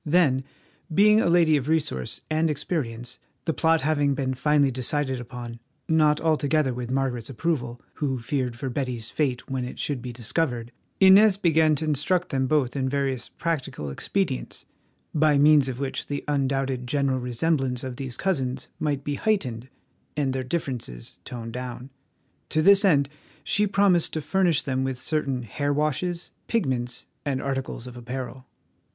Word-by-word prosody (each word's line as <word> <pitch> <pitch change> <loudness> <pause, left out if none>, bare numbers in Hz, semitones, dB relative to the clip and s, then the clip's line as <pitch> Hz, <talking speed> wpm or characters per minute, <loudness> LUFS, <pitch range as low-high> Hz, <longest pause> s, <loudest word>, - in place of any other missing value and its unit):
Then, 150 -5 +3 0.5
being 210 +5 +5
a - - +2
lady 165 -3 +5
of 140 +1 -3
resource 145 - -1
and 160 +1 +1
experience, 125 -5 -3 0.3
the 160 - +1
plot 160 0 +3
having 145 -1 +2
been 130 -1 -1
finally 145 +1 +3
decided 130 +1 -1
upon, 120 -1 -7 0.3
not 155 -2 +4
altogether 155 -3 +2
with 120 -1 -5
Margaret's 130 -3 -1
approval, 125 -4 -2 0.2
who 135 -3 -1
feared 125 0 -2
for 130 +2 -4
Betty's 125 -4 -3
fate 130 -5 -1
when 130 -2 -2
it 125 - -6
should 140 -4 -2
be 125 0 -5
discovered, 120 0 -2 0.3
Inez 195 +1 +7
began 160 -4 +4
to 155 - -2
instruct 155 +5 +1
them 130 -1 0
both 135 -3 +1
in 130 -1 0
various 135 -3 -1
practical 140 - -3
expedients, 60 -2 -2 0.5
by 155 -2 +4
means 145 -1 +6
of 125 - -4
which 135 0 -3
the 145 -1 -3
undoubted 135 -3 0
general 135 0 +1
resemblance 125 +1 0
of 130 -2 -5
these 130 -3 -5
cousins 135 -10 -1
might 145 -3 -1
be 145 - -2
heightened 130 - -1 0.5
and 140 -3 +1
their 130 0 -2
differences 125 - -4
toned 115 -2 -6
down. 125 +1 -6 0.6
To 155 - +1
this 200 +2 +7
end 145 -8 +4 0.4
she 210 0 +2
promised 195 -4 +3
to 155 - -1
furnish 180 -2 +2
them 130 -1 -1
with 130 -1 -2
certain 135 -2 -1
hair 145 +6 -2
washes, 155 +4 -1 0.2
pigments, 125 - -1 0.2
and 140 -3 -1
articles 135 -3 -3
of 125 -1 -8
apparel. 130 +1 -6
135 Hz, 160 wpm, -25 LUFS, 125-155 Hz, 0.6 s, Inez